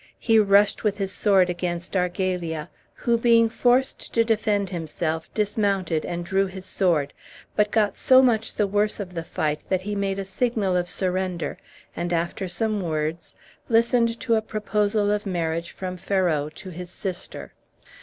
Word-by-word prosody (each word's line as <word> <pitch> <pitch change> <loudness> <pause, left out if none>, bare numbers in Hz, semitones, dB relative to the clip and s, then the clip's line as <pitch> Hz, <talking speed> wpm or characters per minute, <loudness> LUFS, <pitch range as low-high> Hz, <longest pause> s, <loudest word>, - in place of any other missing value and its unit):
he 225 -1 +3
rushed 205 0 +4
with 210 -2 +1
his 195 -2 -2
sword 195 -4 +3
against 175 0 -3
Argalia, 180 -3 -1 0.3
who, 235 -1 +1
being 230 -1 +5
forced 250 +3 +1
to 230 - +3
defend 210 -3 0
himself, 160 -1 -3
dismounted 200 -6 0
and 175 0 -4
drew 195 +2 +1
his 190 0 -9
sword, 165 -8 +1 0.4
but 210 0 +3
got 210 -1 +1
so 260 0 +6
much 230 -4 +2
the 210 - +2
worse 205 +2 0
of 185 -3 -6
the 165 - -3
fight 150 -2 -2
that 185 -1 +1
he 210 +1 -3
made 200 -1 -1
a 195 - -3
signal 200 -1 0
of 175 0 0
surrender, 185 -2 -2 0.4
and, 175 +1 -3
after 170 +4 -1
some 215 +2 -1
words, 160 -1 -3 0.3
listened 230 0 +3
to 235 - 0
a 220 - +3
proposal 210 -1 0
of 210 0 -1
marriage 170 -2 -2
from 185 -1 -6
Ferrau 170 -6 0
to 190 +1 -9
his 180 +1 -8
sister. 185 0 -6
195 Hz, 165 wpm, -24 LUFS, 175-210 Hz, 0.4 s, so